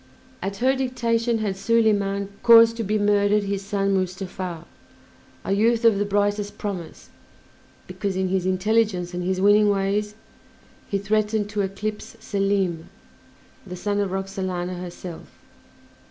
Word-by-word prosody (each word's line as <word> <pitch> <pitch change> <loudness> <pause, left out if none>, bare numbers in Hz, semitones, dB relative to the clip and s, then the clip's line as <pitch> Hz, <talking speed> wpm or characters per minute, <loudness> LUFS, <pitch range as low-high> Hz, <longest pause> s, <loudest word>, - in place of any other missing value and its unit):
At 195 +1 -4
her 260 +4 +2
dictation 235 -3 0
had 210 -3 -2
Soliman 200 -2 +1
caused 230 -1 +7
to 230 - -2
be 210 +1 0
murdered 205 0 +2
his 200 -1 -2
son 195 0 0
Mustafa, 185 -2 -3 0.8
a - - -2
youth 230 +3 +2
of 220 -3 +5
the 205 - +1
brightest 205 0 -1
promise, 185 -6 -6 0.8
because, 200 -2 -4
in 190 0 0
his 185 -1 0
intelligence 185 -2 +1
and 180 0 -3
his 185 +1 -1
winning 205 +2 +5
ways 205 +1 0 0.7
he 200 - 0
threatened 210 +1 0
to 210 -1 -1
eclipse 205 +2 -5
Selim, 195 -4 -1 0.7
the 180 -3 -8
son 205 +3 -2
of 200 -1 0
Roxalana 185 -2 -3
herself. 175 -1 -8
200 Hz, 135 wpm, -23 LUFS, 190-215 Hz, 0.8 s, caused